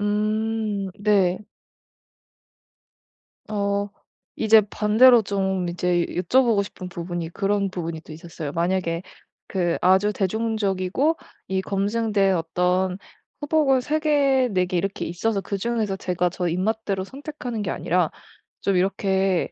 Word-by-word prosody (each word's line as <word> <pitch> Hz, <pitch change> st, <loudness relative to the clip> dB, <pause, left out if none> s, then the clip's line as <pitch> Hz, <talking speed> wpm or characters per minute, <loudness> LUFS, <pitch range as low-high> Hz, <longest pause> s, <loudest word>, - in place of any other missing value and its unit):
음 215 Hz, -1 st, -1 dB
네. 200 Hz, -4 st, +2 dB, 2.1 s
어 200 Hz, -1 st, -1 dB, 0.5 s
이제 220 Hz, 0 st, +6 dB
반대로 225 Hz, +4 st, +5 dB
좀 190 Hz, -3 st, -1 dB
이제 175 Hz, 0 st, 0 dB
여쭤보고 215 Hz, +3 st, +2 dB
싶은 185 Hz, -2 st, -9 dB
부분이 175 Hz, -1 st, -5 dB
그런 200 Hz, +2 st, 0 dB
부분이 165 Hz, -3 st, -5 dB
또 155 Hz, -, -13 dB
있었어요. 160 Hz, -2 st, -7 dB
만약에 170 Hz, 0 st, -1 dB, 0.5 s
그 175 Hz, -3 st, 0 dB
아주 190 Hz, +3 st, +4 dB
대중적이고 215 Hz, -, 0 dB, 0.3 s
이 190 Hz, 0 st, 0 dB
검증된 200 Hz, -1 st, +1 dB
어떤 180 Hz, +2 st, 0 dB, 0.4 s
후보가 290 Hz, -3 st, +3 dB
3 310 Hz, +4 st, -1 dB
개 275 Hz, -4 st, +3 dB
4 185 Hz, -1 st, +2 dB
개 180 Hz, 0 st, -2 dB
이렇게 195 Hz, +2 st, -2 dB
있어서 195 Hz, +4 st, -1 dB
그중에서 210 Hz, +1 st, -2 dB
제가 180 Hz, -2 st, -1 dB
저 180 Hz, 0 st, -3 dB
입맛대로 195 Hz, +2 st, -1 dB
선택하는 260 Hz, -2 st, -6 dB
게 185 Hz, -, -2 dB
아니라 175 Hz, -2 st, 0 dB, 0.5 s
좀 195 Hz, -, +1 dB
이렇게 190 Hz, 0 st, +1 dB
195 Hz, 250 characters per minute, -23 LUFS, 180-220 Hz, 2.1 s, 이제